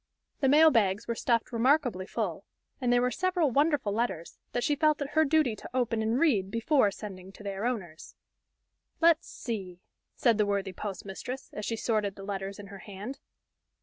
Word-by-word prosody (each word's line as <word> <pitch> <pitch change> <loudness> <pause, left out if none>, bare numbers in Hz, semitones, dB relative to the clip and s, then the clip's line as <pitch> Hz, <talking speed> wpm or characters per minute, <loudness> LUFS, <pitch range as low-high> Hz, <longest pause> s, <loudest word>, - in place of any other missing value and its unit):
The 270 - +3
mail 310 +3 +7
bags 210 -3 +2
were 235 - 0
stuffed 230 0 0
remarkably 240 -5 +2
full, 200 -6 -3 0.4
and 245 -1 +1
there 245 0 +4
were 250 - +1
several 360 - +1
wonderful 285 -6 +2
letters, 215 -7 -3
that 245 - -1
she 295 - +2
felt 305 +1 +2
it 285 -1 -4
her 315 - +4
duty 305 -6 +2
to - - -10
open 235 -3 +1
and 225 +3 +1
read 220 - +2
before 230 +1 +3
sending 190 -2 -9
to 210 - -13
their 200 +3 -2
owners. 180 -10 -5 0.8
"Let's 335 -1 +4
see," 190 -7 -5 0.4
said 230 -4 +2
the 210 - +4
worthy 200 -1 -1
postmistress, 200 +6 -6
as 210 - -5
she 230 - -1
sorted 215 -3 -1
the 195 - -10
letters 195 0 -4
in 205 -1 -10
her 200 - -9
hand. 210 +8 -8
230 Hz, 180 wpm, -29 LUFS, 200-270 Hz, 0.8 s, mail